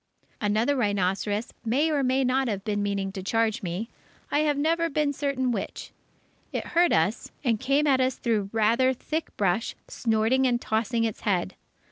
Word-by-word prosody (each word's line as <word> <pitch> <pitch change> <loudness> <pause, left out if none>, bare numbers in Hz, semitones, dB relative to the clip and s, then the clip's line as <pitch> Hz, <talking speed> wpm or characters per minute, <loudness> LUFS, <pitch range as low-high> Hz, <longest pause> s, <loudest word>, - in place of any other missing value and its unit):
Another 220 +6 +2
rhinoceros 205 -1 0
may 275 +8 +1
or 290 -2 +1
may 260 +1 +2
not 260 +1 +1
have 200 -4 -2
been 205 -1 -1
meaning 200 -1 -1
to 190 -1 -6
charge 225 +2 0
me; 185 +5 -3 0.4
I 290 - +2
have 300 -2 +2
never 330 +3 +1
been 295 -1 0
certain 270 -3 -1
which. 210 -5 -5 0.6
It - - -4
heard 345 0 +4
us, 165 +8 +1
and 230 -5 +1
came 275 +4 +2
at 265 -3 +3
us 255 0 +1
through 215 -5 -1
rather 230 +4 +3
thick 315 +5 -4
brush, 200 +3 0
snorting 230 +3 +1
and 240 -1 +1
tossing 230 +1 0
its 225 -2 -2
head. 190 -2 0
230 Hz, 170 wpm, -26 LUFS, 205-270 Hz, 0.6 s, heard